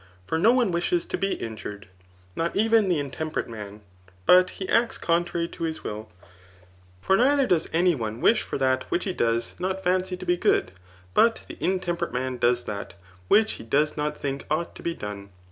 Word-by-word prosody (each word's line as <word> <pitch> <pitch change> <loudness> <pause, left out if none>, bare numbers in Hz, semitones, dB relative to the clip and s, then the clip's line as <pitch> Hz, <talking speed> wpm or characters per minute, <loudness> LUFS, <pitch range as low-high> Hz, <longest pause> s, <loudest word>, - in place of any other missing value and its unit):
For 160 - -1
po 225 - +6
one 245 -6 +2
wishes 170 0 0
to - - -3
be 195 0 0
injured, 105 -2 -7 0.5
not 170 +1 -1
even 220 0 +4
the 175 - +2
intemperate 150 +2 -3
man; 105 -2 -8 0.4
but 180 0 +6
be 190 - -4
acts 235 0 +2
contrary 170 0 0
to - - -12
his 160 -1 -4
wilL 105 +1 -6 0.9
For 190 - +3
neither 275 +5 +4
does 175 -8 +1
any 175 +2 +3
one 115 -5 -4
wish 220 - +4
for - - -4
that 130 -1 0
which 175 - 0
he 190 - -2
does 115 -5 0
not 190 +1 -2
fancy 185 0 0
to - - -8
be 175 - +2
good 95 - +2 0.2
} 90 0 -26
but 230 0 +3
the - - -9
intemperate 175 -2 -1
man 130 0 -2
does 120 0 +2
that, 100 -1 -6 0.3
which 220 - +4
he - - -9
does 145 +7 +1
not 150 0 -2
think 140 -1 -3
ought 155 +3 -1
to - - -11
be 170 -1 -2
done. 100 -1 -7
165 Hz, 195 wpm, -25 LUFS, 120-185 Hz, 0.9 s, po